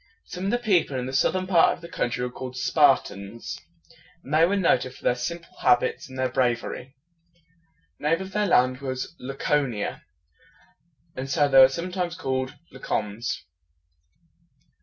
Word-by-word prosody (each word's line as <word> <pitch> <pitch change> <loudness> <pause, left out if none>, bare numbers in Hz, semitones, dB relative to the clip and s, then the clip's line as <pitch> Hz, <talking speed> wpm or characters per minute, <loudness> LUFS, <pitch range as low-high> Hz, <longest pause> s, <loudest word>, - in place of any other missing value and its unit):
Some 180 +1 -6
of - - +1
the 240 - +2
people 190 - +1
in 125 - -2
the 130 - -5
southern 185 +7 +1
part 180 -3 +4
of - - -11
the 170 - -9
country 125 -5 -2
were 125 - -5
called 130 0 -7
Spar 145 0 +5
tans, 100 -4 -8 0.6
and 140 - -7
they 160 +2 +5
were 200 - +1
noted 130 -9 +1
for - - -17
their - - +3
simple 170 +8 -6
habits 465 - +2
and 130 - -10
their 130 0 +1
brav 125 -1 +1
er - - -4
y. 130 +2 -10 1.0
The 150 - -1
name 165 - +2
of 190 0 -7
their 210 +1 0
land 130 -5 +3
was 130 -2 -5
La 135 +2 -6
co´ni 135 -8 0
a, - - -8 1.1
and 130 +1 -5
so 145 0 +3
they 135 -1 +6
were 130 0 +9
sometimes 175 +3 -3
called 130 -4 -2 0.2
La 135 - -12
cons. 105 -6 -3
135 Hz, 180 wpm, -25 LUFS, 125-170 Hz, 1.1 s, were